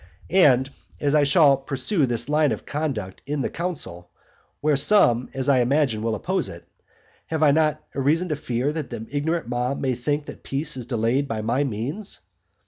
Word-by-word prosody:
And, 135 -8 +5 0.3
as 145 0 +1
I 150 - +5
shall 140 -2 +5
pursue 135 +4 -1
this 120 -1 -1
line 150 0 +2
of - - -4
conduct 130 -11 -4
in 145 -1 -1
the - - -2
council, 145 - -5 0.5
where 150 0 +2
some, 135 - +4
as 135 0 -1
I 135 -2 +4
imagine, 130 -2 +1
will 115 0 -1
oppose - - -2
it, - - -11 0.6
have 160 -1 -1
I 145 - +6
not 155 0 +1
reason 155 +6 +1
to 150 - 0
fear 130 0 -2
that 155 -4 -4
the 110 - -6
ignorant 160 +1 -1
mob 125 +2 -1
may 130 -2 0
think 145 +5 -2
that - - -10
peace 145 +2 -2
is 125 -3 -7
delayed 120 +3 0
by 110 -4 -3
my 120 +6 +1
means? 140 - -4
140 Hz, 185 wpm, -24 LUFS, 125-150 Hz, 0.6 s, I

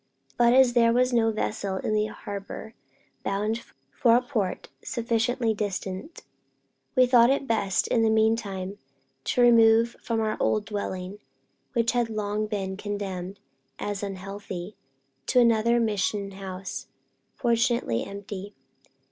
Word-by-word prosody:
But 240 0 +4
as 260 -2 +6
there 230 -1 +5
was 250 +1 +2
no 225 -1 +3
vessel 210 -2 -2
in 215 - -2
the 215 0 +2
harbor 205 +1 -7 0.5
bound 210 +4 -1 0.3
for 235 -2 +4
a 245 - +4
port 220 -8 -2 0.2
sufficiently 230 0 0
distant, 205 - -4 0.7
we 255 -1 +6
thought 245 -1 +6
it 275 0 +1
best, 205 -5 +1
in 230 - +2
the 225 - +3
meantime, 215 -3 0 0.5
to 250 - +1
remove 230 -1 +5
from 230 -1 -1
our 215 -1 -1
old 215 -1 +1
dwelling, 200 -2 -4 0.5
which 235 -2 +2
had 240 -2 0
long 215 0 -2
been 195 -3 -3
condemned 200 -2 -5 0.4
as 205 -1 -3
unhealthy, 195 -1 -6 0.5
to 250 - +4
another 235 0 +4
mission 205 -2 0
house, 190 -1 -7 0.5
fortunately 235 - +1
empty. 200 0 -7
215 Hz, 130 wpm, -26 LUFS, 200-235 Hz, 0.7 s, as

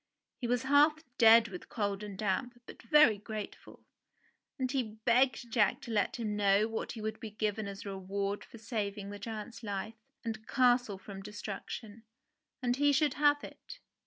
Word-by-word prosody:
He 245 - -2
was 245 +1 +1
half 295 +3 +4 0.2
dead 230 0 +7
with 180 -2 -9
cold 205 -2 -2
and 205 -2 -7
damp, 220 +5 -2
but - - -12
very 230 -4 +5
grateful; 215 0 -8 0.7
and 255 -2 -1
he 235 -6 -2
begged 245 -1 +3
Jack 210 -4 +3
to 235 - -7
let 210 -2 +1
him 215 -3 -2
know 205 +1 +3
what 225 0 -4
he 225 - -7
would 220 0 -4
be 220 - -6
given 210 0 -2
as 200 0 -7
a - - -4
reward 195 +1 -3
for - - -13
saving 205 -2 -4
the 205 - -7
giant's 225 +1 -6
life 205 0 -4 0.3
and 220 -1 -5
castle 245 -5 +3
from 195 0 -9
destruction, 210 +2 -7 0.6
and 245 0 +1
he 290 +1 +4
should 295 +1 +3
have 290 0 +3
it. - - -10
220 Hz, 175 wpm, -32 LUFS, 205-245 Hz, 0.7 s, dead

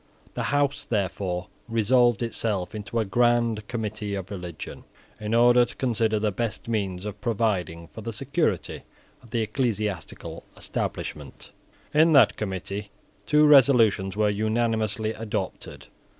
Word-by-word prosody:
The - - -3
House, 145 0 +1
therefore, 95 -3 -2 0.2
resolved 120 +1 +3
itself 105 -5 -2
into 105 +2 -5
a 110 - +1
Grand 120 0 +2
Committee 105 -3 -3
of 95 0 -6
Religion, 90 -5 -7 0.4
in 105 +1 -1
order 120 +1 +6
to 120 - -6
consider 115 -4 +1
the 105 0 0
best 110 +3 -4
means 100 -4 -2
of 105 -1 -6
providing 100 -7 -1
for - - -9
the 115 - -4
security 135 - -1 0.4
of 120 - -17
the 115 0 -1
ecclesiastical 105 - -3
establishment. 75 -3 -5 0.4
In 160 +2 +5
that 140 - +6
Committee 100 +1 -4 0.4
two 150 0 +5
resolutions 115 -9 +5
were 105 -1 +3
unanimously 110 0 0
adopted. 105 -4 -5
110 Hz, 130 wpm, -25 LUFS, 100-120 Hz, 0.4 s, order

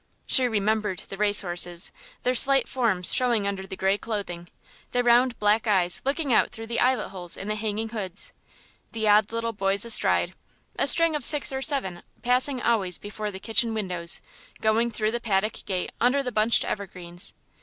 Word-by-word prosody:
She 255 -2 +2
remembered 215 -3 -1
the 195 - -7
race 205 0 +3
horses, 175 -1 +1 0.3
their 250 - +1
slight 270 +2 +5
forms 220 -9 0
showing 240 -5 +1
under 195 -1 -4
the 190 - -7
grey 195 +2 0
clothing, 185 -6 -6 0.5
the 245 0 +1
round 240 0 +3
black 210 +2 +1
eyes 180 -4 +1
looking 275 -1 -1
out - - +3
through 225 - -8
the 235 +1 -3
eyelet 255 0 +1
holes 180 -3 -7
in 195 - -8
the - - 0
hanging 215 +1 -4
hoods, 220 - -3 0.6
the 220 -1 -2
odd 210 0 +3
little 230 0 -3
boys 195 +1 0
astride 230 - +3 0.4
a - - 0
string 330 -2 +6
of 295 - -4
six 290 +2 +5
or 265 - -4
seven 260 - 0 0.2
passing 250 +2 +2
always 195 -7 0
before 210 +1 -6
the 195 - -8
kitchen 225 +1 +1
windows, 180 -5 0 0.4
going 220 +2 +1
through 215 -2 -2
the 240 +1 -4
paddock 210 -1 -2
gate 185 -2 -3
under 260 +4 +2
the 250 - -4
bunched 220 +1 +3
evergreens. 180 -2 -7
215 Hz, 180 wpm, -24 LUFS, 195-240 Hz, 0.6 s, string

